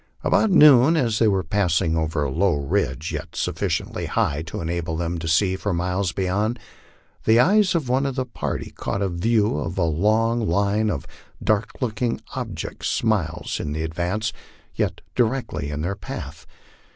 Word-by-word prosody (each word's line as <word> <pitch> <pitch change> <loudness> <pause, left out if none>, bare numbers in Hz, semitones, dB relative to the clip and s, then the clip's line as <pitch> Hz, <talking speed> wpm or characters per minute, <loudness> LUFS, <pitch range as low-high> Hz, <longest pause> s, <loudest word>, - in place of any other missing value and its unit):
About 220 - +3
noon, 150 -3 +7
as 115 -7 +1
they 115 - +4
were 95 -3 +2
passing 85 -2 +1
over 80 -1 0
a 70 - -2
low 90 +3 +2
ridge, 70 +1 -1
yet - - -6
sufficiently - - -2
high 70 +1 0
to - - -5
enable 85 -1 -2
them 85 0 -2
to 80 - -5
gee 95 +4 +3
for 95 -1 -2
miles 90 +1 -1
beyond, 100 +6 -1 0.7
the 110 +1 +5
eyes 190 +5 +4
of 155 -6 0
one 130 +3 +1
of 135 - -3
the 130 -1 -1
party 120 - -4
caught 100 - -3
a 95 - 0
view 105 -1 +1
of 85 +6 -4
a 90 - +2
long 110 +7 +1
line 100 +4 +1
of 75 -9 -3 0.4
dark 110 0 0
looking 120 0 -1 0.2
objects - - -3
miles 105 -9 -1
in 75 0 -3
advance, 85 +7 -2 0.4
yet - - -2
directly 120 - -1
in 75 0 -3
their 95 +5 -2
path. 100 - -8
100 Hz, 165 wpm, -23 LUFS, 85-115 Hz, 0.7 s, noon